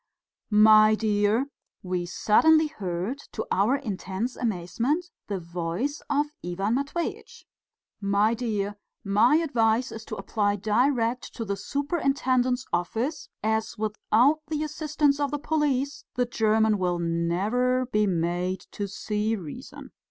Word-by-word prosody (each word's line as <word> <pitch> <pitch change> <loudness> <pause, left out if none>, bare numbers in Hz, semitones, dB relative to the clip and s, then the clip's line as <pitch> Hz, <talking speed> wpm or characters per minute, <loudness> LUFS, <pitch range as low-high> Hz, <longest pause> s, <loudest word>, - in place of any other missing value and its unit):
"My 215 0 +7
dear" 215 +3 +1 0.4
we 180 -1 -2
suddenly 315 - +4
heard, 200 - -4
to - - -3
our 210 +8 +3
intense 220 -2 -4
amazement, 240 - -1 0.2
the 200 -2 -2
voice 175 - -3
of 290 0 +2 0.2
Ivan 190 +5 -1
Matveitch 280 +6 -3 0.6
"my 200 +2 +2
dear, 210 -4 -2 0.3
my 215 +7 +4
advice 245 -7 +2
is 225 - -7
to - - -5
apply 205 -2 0
direct 235 +4 0
to 230 - -4
the 200 -1 -2
superintendent's 260 - 0
office, 230 - -2
as 220 +1 -1
without 220 +7 +2
the 305 0 -2
assistance 300 -2 0
of 285 -1 +1
the 295 - -2
police 290 -2 -1
the 250 0 +2
German 220 -2 +2
will 180 -1 0
never 190 +10 0
be 210 -4 +1
made 175 +1 -1
to 205 - -4
see 210 +2 -2
reason." 165 -8 -9
220 Hz, 125 wpm, -26 LUFS, 200-270 Hz, 0.6 s, My